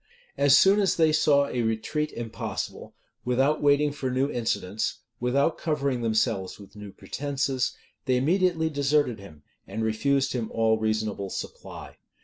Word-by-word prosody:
As 140 -1 +5
soon 195 +2 +5
as 195 -2 +2
they 160 -2 +3
saw 145 -2 +4
a 125 -3 -2
retreat 115 +7 -1
impossible, 115 -1 -6 0.3
without 135 +5 +1
waiting 145 0 +3
for 135 -2 -4
new 130 +3 0
incidents, 110 -4 -2 0.2
without 140 +6 +1
covering 140 -5 -1
themselves 110 -4 0
with 100 0 -14
new 105 -1 -9
pretences, 135 +1 -2 0.3
they 130 -1 +2
immediately 165 +3 +1
deserted 140 -5 +1
him, 75 -7 -14 0.2
and 110 +3 -4
refused 135 +5 +1
him 120 -3 -3
all 110 -1 +2
reasonable 110 -2 -2
supply. - - -8
130 Hz, 140 wpm, -26 LUFS, 110-145 Hz, 0.3 s, As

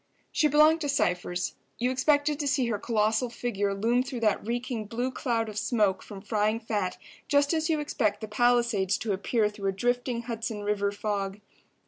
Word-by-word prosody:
She 305 - +3
belonged 305 +2 +5
to 290 - -1
Cypher's. 180 -9 0 0.2
You 250 +2 0
expected 290 +2 +2
to 290 - -1
see 270 -2 +2
her 210 -3 -1
colossal 220 +2 +1
figure 215 -4 -2
loom 230 +5 +2
through 255 -2 -5
that 215 -2 +2
reeking 240 0 -3
blue 240 +5 -2
cloud 230 -3 -1
of 215 -1 -4
smoke 210 -6 +1
from 200 -2 -10
frying 215 0 +1
fat 205 -5 -2 0.3
just 285 +1 +3
as 320 0 0
you 315 -2 +2
expect 225 -8 0
the 220 - -6
Palisades 230 -4 +2
to 220 -3 -2
appear 210 +3 +1
through 210 -2 -3
a - - -1
drifting 245 +2 -1
Hudson 225 -3 -4
River 205 -1 0
fog. 200 -1 -3
230 Hz, 180 wpm, -28 LUFS, 205-255 Hz, 0.3 s, belonged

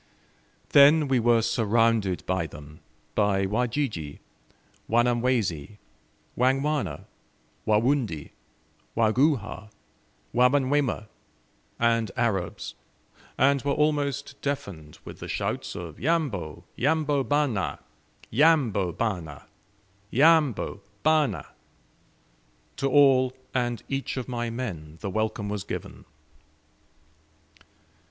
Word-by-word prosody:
Then 145 +2 +6
we 130 -2 +2
were 115 -1 +3
surrounded 115 -4 +1
by 95 -3 -1
them: 75 -1 -12 0.3
by 100 -2 +2
Wajiji, 110 - -2 0.7
Wanyamwezi, 115 - +1 0.6
Wangwana, 130 - 0 0.6
Warundi, 110 - +1 0.7
Waguhha, 110 -3 +1 0.6
Wamanyuema, 130 -1 +2 0.7
and 115 -2 +2
Arabs, 105 -8 -1 0.6
and 140 0 +3
were 140 +1 0
almost 145 -2 -1
deafened 95 - -5
with - - -10
the - - -7
shouts - - -3
of 85 -3 -8
"Yambo, 130 - -1
yambo, 145 0 +1
bana! 145 -9 0 0.5
Yambo, 120 - +3
bana! 90 - -3 0.6
Yambo, 145 -7 +3 0.2
bana!" 150 - +2 1.3
To 135 - 0
all 130 -2 +5 0.2
and 120 -3 -1
each 135 0 -3
of 130 - -4
my 120 -2 -3
men 90 -11 -6
the 100 - -3
welcome 110 0 -2
was 100 -1 -3
given. - - -7
120 Hz, 90 wpm, -26 LUFS, 100-140 Hz, 1.3 s, Then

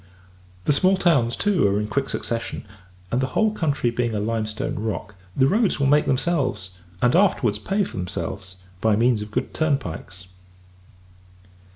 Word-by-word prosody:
The 150 - +3
small 185 +6 +3
towns, 135 -11 +2
too, 195 - +2
are 100 +1 +1
in 105 - -1
quick 135 +4 -1
succession; 115 -1 -3 0.5
and, 125 - +1
the 130 - 0
whole 220 -1 +3
country 145 - 0
being 120 -1 -1
a - - 0
limestone 115 +6 -2
rock, 105 0 -4 0.2
the 130 - +5
roads 205 - +2
will 140 - +2
make 145 +2 +4
themselves, 130 - 0 0.3
and 125 +3 +4
afterwards 130 - +3
pay 195 - 0
themselves, 95 - -5 0.3
by 110 -2 +3
means 115 0 +2
of 105 - -6
good - - -3
turnpikes. 95 - -2
120 Hz, 155 wpm, -23 LUFS, 105-150 Hz, 0.5 s, the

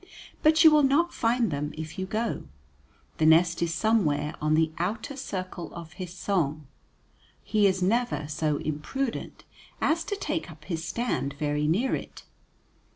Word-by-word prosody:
But 315 +1 +5
you 320 - +9
will 305 0 +6
not 290 +5 +3
find 230 -2 +1
them 145 +1 -3
if 160 +2 -6
you 190 - -2
go. 220 +3 -2 0.7
The 155 - +3
nest 170 +2 +5
is 170 -1 +1
somewhere 165 -6 +1
on 155 0 +2
the 160 0 +2
outer 220 +10 -2
circle 185 - -5
of 165 -2 -9
his 180 0 -7
song; 165 -5 -1 0.8
he 210 -1 +3
is 185 -1 +1
never 230 -5 +1
so 150 -1 0
imprudent 190 - -4 0.4
as 330 +1 +1
to 405 - -2
take 320 - -3
up 155 -1 -13
his 165 -3 -3
stand 170 - -2
very 150 0 0
near 210 +12 +1
it. - - -5
180 Hz, 155 wpm, -27 LUFS, 155-235 Hz, 0.8 s, you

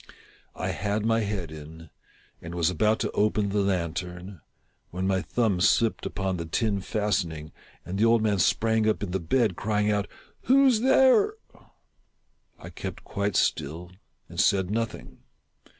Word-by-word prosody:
I - - -3
had 105 +1 -2
my 115 0 +2
head 100 -7 -3
in, 80 +1 -11 0.5
and 85 +1 -8
was 85 0 +1
about 105 +6 +2
to 105 - -1
open 105 -1 +1
the 105 +1 0
lantern, 90 -1 -3 0.5
when 90 +2 -4
my 95 -1 +1
thumb 105 -5 0
slipped 110 +3 +2
upon 95 -2 -2
the 85 - -4
tin 100 +3 0
fastening, 90 -7 -2 0.3
and 95 +3 -4
the 110 - +4
old 115 -1 +4
man 105 -3 +1
sprang 110 +2 +2
up 110 - -1
in 95 - -4
the 95 - -1
bed, 100 +3 +1
crying 105 +1 0
out 105 -1 0
— - - -27
" - - -44
Who 275 +2 +5
's 245 -4 +3
there? 265 - +4 0.6
" - - -45
I - - -11
kept - - -7
quite 100 +1 -2
still 85 +5 -1 0.4
and - - -8
said 95 -2 +2
nothing. 115 +1 -4
100 Hz, 165 wpm, -26 LUFS, 90-110 Hz, 0.6 s, Who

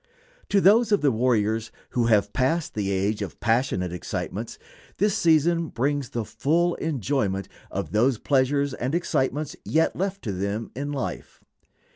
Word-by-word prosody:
To 200 - +4
those 220 +5 +5
of 205 - +3
the 145 - +3
warriors 110 -2 +1 0.2
who 120 -2 +1
have 105 -3 +3
passed 145 +8 0
the 100 -2 -2
age 100 +2 0
of 100 - -6
passionate 115 -7 0
excitements, 90 - -5 0.4
this 205 +1 +2
season 165 +1 +3
brings 140 0 -1
the 115 -2 -3
full 155 +11 +1
enjoyment 130 -9 -1 0.2
of - - -4
those 120 +4 +3
pleasures 140 +2 +1
and 130 +4 -2
excitements 150 -3 -1
yet 160 +1 +1
left 195 +1 -3
to 105 - -2
them 100 +4 -3
in 145 +2 -3
life. 135 -3 -5
130 Hz, 150 wpm, -25 LUFS, 110-160 Hz, 0.4 s, those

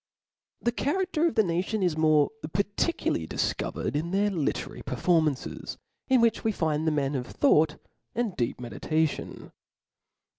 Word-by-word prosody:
The 240 - +2
charafter 340 +5 0
of 330 - -2
the 220 - +5
nation 185 +4 -1
is 175 -4 +2
more 155 -2 +4 0.2
particularly 200 - 0
difcovered 130 - -2
in 160 +3 -1
their 200 +3 +1
literary 160 -7 -2
performances, 160 -6 0 0.3
in 260 -2 +4
which 230 -1 +2
we 225 - +2
find 160 -4 0
the - - +4
men 145 -2 0
of 125 -3 -3
thought 160 - +3 0.4
and 230 -5 -1
deep 120 -1 -1
meditation. 150 +7 -2
170 Hz, 140 wpm, -27 LUFS, 150-220 Hz, 0.4 s, the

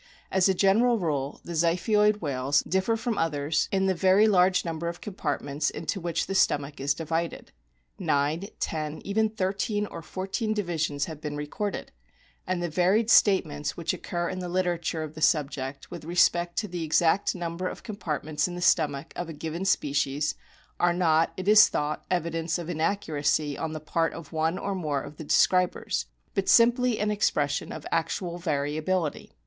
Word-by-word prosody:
As 190 0 +3
a 190 - +2
general 225 +6 +4
rule 145 -7 -2
the - - -8
Ziphioid 210 +6 +2
whales 140 0 +1
differ 190 +5 0
from 230 -1 -2
others 155 -1 0
in 195 -1 +1
the 190 - +2
very 190 +4 +4
large 185 -3 +3
number 165 0 -3
of 170 +1 -4
compartments 150 -6 -2
into 195 - -4
which 170 -1 -1
the 195 - -4
stomach 145 -6 +1
is 140 +1 +1
divided. 165 +1 -3 0.5
Nine, 150 +7 0
ten, 155 -1 -3
even 220 +2 +1
thirteen 205 +1 -1
or 170 - -8
fourteen 195 +6 -3
divisions 155 -7 -1
have 155 -3 -8
been 150 -1 -4
recorded; 170 +8 -4 0.6
and 180 -1 -1
the - - 0
varied 185 +7 +2
statements 155 -8 +3
which 165 -2 -1
occur 175 -1 -3
in 185 +1 -4
the 180 -1 -4
literature 175 -3 -1
of 155 -1 -7
the 155 - -9
subject 145 -3 0
with 175 -3 -7
respect 175 +1 +2
to 210 - 0
the 175 -3 -4
exact 160 +5 +2
number 175 +1 -3
of - - -7
com 215 - -6
partments 155 -3 -2
in 175 - -6
the - - -5
stomach 155 -4 +1
of 175 -1 -4
a - - -5
given 160 +4 -4
species 145 -4 +1 0.5
are 175 0 +3
not, 165 -2 +3
it 185 +1 -5
is 215 +1 +8
thought, 150 +1 -2
evidence 165 -2 -1
of 175 0 -5
inaccuracy 155 -4 0
on 160 +2 -3
the 155 - -4
part 165 +2 -1
of 165 -1 -10
one 160 +3 0
or 200 - -3
more 150 -7 -2
of 150 - -10
the - - -7
describers, 175 - +2 0.3
but 195 - -1
simply 240 0 +5
an 210 0 0
expression 145 -8 0
of 155 - -7
actual 175 +1 -1
variability. 155 +1 -2
170 Hz, 175 wpm, -27 LUFS, 150-190 Hz, 0.6 s, is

